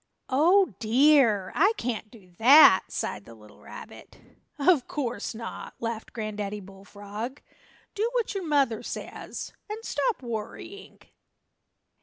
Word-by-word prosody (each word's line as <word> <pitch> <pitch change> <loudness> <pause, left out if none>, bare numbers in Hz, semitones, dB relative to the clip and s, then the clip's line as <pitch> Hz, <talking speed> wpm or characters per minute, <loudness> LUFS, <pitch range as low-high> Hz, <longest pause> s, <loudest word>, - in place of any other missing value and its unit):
"Oh, 340 - +4
dear, 235 -4 +4
I 395 +7 +3
can't 230 -2 -4
do 200 -6 -18
that!" 255 -4 +8
sighed 105 - -4
the 115 - -13
little 105 -1 -18
rabbit. - - -12 0.4
"Of 290 -2 +3
course 245 -5 -4
not," 230 +1 -8
laughed 230 -1 -5
Granddaddy 210 -2 -4
Bullfrog. 205 +6 -8 0.5
"Do 440 +2 -1
what 485 -3 -1
your 390 -2 -4
mother 280 -8 +1
says, - - -7 0.2
and 440 +2 -6
stop 470 - -1
worrying!" 240 - -7
235 Hz, 120 wpm, -26 LUFS, 210-310 Hz, 0.5 s, that